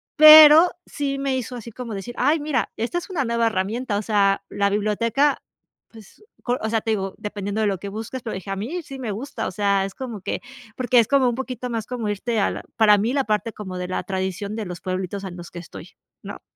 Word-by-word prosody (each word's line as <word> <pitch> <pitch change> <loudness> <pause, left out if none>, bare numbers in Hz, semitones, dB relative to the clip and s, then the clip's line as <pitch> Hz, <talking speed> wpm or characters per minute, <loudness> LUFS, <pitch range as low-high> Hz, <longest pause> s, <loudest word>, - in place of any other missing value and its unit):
pero 310 +2 +10
sí 275 -1 -3
me 275 -1 -1
hizo 250 0 -5
así 235 0 -9
como 235 0 -7
decir: 220 +5 -7
"Ay, 295 +5 +2
mira, 290 -4 -1
esta 240 +10 -1
es 350 - -11
una 315 -8 -1
nueva 235 0 +1
herramienta," 220 +2 -1
o - - -1
sea, 200 -2 +2
la 200 0 0
biblioteca, 230 +7 +1 0.5
pues 225 - -16 0.2
col 245 0 0
o 220 - -2
sea, 225 -1 +1
te - - -5
digo, 195 -3 -2
dependiendo 210 0 -4
de 215 - +2
lo 195 -2 0
que 200 - -6
busques, 225 +5 -6
pero 225 - -4
dije: 190 +1 -8
"A - - -1
mí 285 - -4
sí 275 -2 -9
me 235 -5 -3
gusta," 225 +1 -5
o - - -4
sea, 200 0 +1
es 195 - -7
como 235 -6 -6
que - - -3 0.4
porque 250 -1 +1
es 225 - +3
como 270 -2 +3
un 240 - -2
poquito 255 -1 -5
más 225 -2 -3
como 240 -4 -3
irte 220 +3 -2
a 200 - +2
la - - -6
para 210 -2 +6
mí 220 +5 0
la 275 -2 +1
parte 215 +1 -1
como 185 -3 -7
de 180 0 -4
la 185 - -2
tradición 190 +2 -3
de 220 -2 -4
los 180 -1 -7
pueblitos, 185 +1 -4
ah, - - -4
en 175 - -10
los 175 0 -10
que 175 - -7
estoy, 170 - -11 0.3
¿no? - - -8
220 Hz, 245 wpm, -23 LUFS, 200-255 Hz, 0.5 s, pero